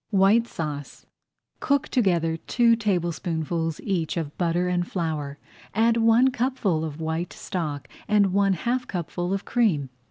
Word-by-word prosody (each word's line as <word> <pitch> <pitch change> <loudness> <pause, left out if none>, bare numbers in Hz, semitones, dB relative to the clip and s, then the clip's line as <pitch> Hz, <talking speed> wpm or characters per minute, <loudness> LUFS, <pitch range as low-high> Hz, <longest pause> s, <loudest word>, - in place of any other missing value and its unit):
WHITE 210 +3 +4
SAUCE 150 - -6 0.5
Cook 280 -2 +1
together 175 -9 +2
two 230 +7 +3
tablespoonfuls 170 -5 -1
each 175 -5 -1
of 155 -3 -3
butter 175 0 0
and 175 -1 0
flour, 155 -5 -3 0.4
add 230 +2 +3
one 230 +3 +5
cupful 235 -10 0
of 155 -1 -5
white 160 +2 -2
stock 150 -6 -4 0.2
and 205 -3 +3
one 200 0 +3
half 245 +7 -1
cupful 175 0 -3
of 195 0 -2
cream. 170 - +1
180 Hz, 135 wpm, -25 LUFS, 160-225 Hz, 0.5 s, one